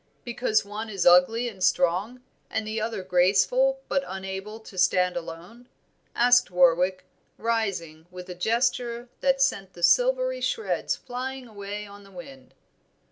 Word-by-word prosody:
"Because 235 -3 0
one 215 +2 -6
is 195 -4 -2
ugly 180 +7 +5
and 195 -5 -6
strong, 200 +11 +1 0.3
the 220 0 -3
other 220 -3 -3
graceful 205 - +2
but 275 -1 0
unable 190 +3 -6
to 220 - -14
stand 180 0 +2
alone?" 175 +8 -9 0.5
asked 245 -1 +4
Warwick, 180 +1 +2 0.3
rising, 190 -9 -2
with 180 0 -10
a 180 - -6
gesture 235 +4 -1
that 270 0 +2
sent 195 -8 -1
the 175 - -11
silvery - - +3
shreds 450 - -1
flying 260 +1 -6
away 205 -1 -7
on 200 0 -13
the 195 - -17
wind. 265 +4 -13
215 Hz, 135 wpm, -26 LUFS, 185-245 Hz, 0.5 s, ugly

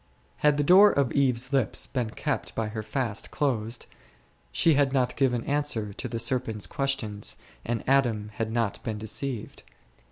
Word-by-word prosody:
Had 150 -1 +3
the 145 - +2
door 190 +7 +8
of 140 -3 +1
Eve's 130 -1 +1
lips 135 -5 +1
been 125 -4 -2
kept - - -3
by 110 -1 -1
her 110 0 -4
fast 110 0 -3
closed, 120 -5 -1 0.7
she 160 - +4
had 140 -1 +2
not 125 -2 +1
given 125 -4 +1
answer 140 -8 -1
to - - -5
the 115 - -4
serpent's 115 -2 -1
questions 115 -7 -2 0.3
and 120 -1 -2
Adam 120 -6 +2
had 110 +1 -3
not 115 -3 -1
been 110 -4 -3
deceived. 110 +2 -4
120 Hz, 160 wpm, -27 LUFS, 110-140 Hz, 0.7 s, door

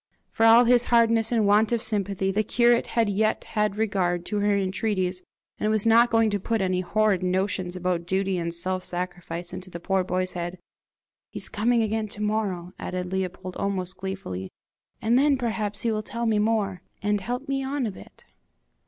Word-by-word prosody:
For 225 - +3
all 230 +2 +8
his 240 0 +4
hardness 230 -1 +3
and 225 -3 +2
want 210 +2 +4
of 235 -1 0
sympathy, 200 -2 0
the 210 +2 +1
curate 235 +2 +3
had 230 -2 +4
yet 215 +2 +1
had 210 -1 -1
regard 185 -5 0
to 210 - -2
her 205 0 +2
entreaties, 190 -1 -1 0.4
and 215 - 0
was 215 -1 +2
not 230 +2 +6
going 225 -2 +3
to 205 - 0
put 225 +4 -1
any 185 -1 0
horrid 205 0 +1
notions 185 0 -1
about 180 -1 -2
duty 190 0 0
and 170 0 -2
self 185 +2 -2
sacrifice 175 -1 -5
into 185 0 -7
the 170 - -7
poor 190 +2 0
boy's 185 0 -1
head! 175 +1 -4 0.7
"He's - - -2
coming 230 +2 +2
again 220 0 -1
to 205 0 -8
morrow," 195 -5 -2
added 180 0 -4
Leopold, 185 -1 -4
almost 185 -2 -2
gleefully, 185 - -5 0.5
"and 235 +3 +4
then 285 0 +3
perhaps 220 -4 -2
he 230 - 0
will 215 -1 -1
tell 235 +2 -4
me 220 -2 +2
more, 210 -4 0 0.2
and 205 0 +1
help 245 +7 -4
me 270 -1 -1
on 270 -1 -2
a 215 - -2
bit!" - - -15
205 Hz, 190 wpm, -25 LUFS, 185-225 Hz, 0.7 s, all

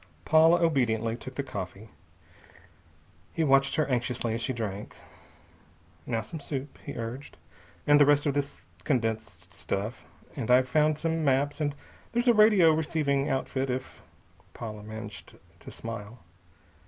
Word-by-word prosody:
Paula 160 +2 +6
obediently 115 -8 +1
took 130 +1 -9
the 140 - -2
coffee. 100 -3 -7 1.4
He 165 - 0
watched 135 -1 +4
her 155 - +2
anxiously 120 -3 -1
as 115 - -3
she 130 - -1
drank. 105 -4 -5 1.1
"Now 115 -2 -1
some 155 +9 -7
soup," 140 -1 -5
he - - -7
urged, 120 +4 -6 0.5
"and 145 0 +6
the - - +8
rest 145 0 +4
of 145 - +1
this 145 0 -3 0.2
condensed 110 - -2
stuff. 100 +8 -4 0.3
And 130 -5 -4
I've 125 +1 +5
found 155 +1 +2
some 165 0 -1
maps 140 +2 +1
and 145 -1 0 0.4
there's 240 +2 +1
a 240 - +7
radio 210 -6 +6
receiving 150 -3 0
outfit 135 0 -1
if 130 +1 -4 0.2
" - - -31
Paula 110 -3 -6
managed 110 -2 -9 0.2
to - - -11
smile. 115 0 -7
130 Hz, 145 wpm, -28 LUFS, 115-150 Hz, 1.4 s, the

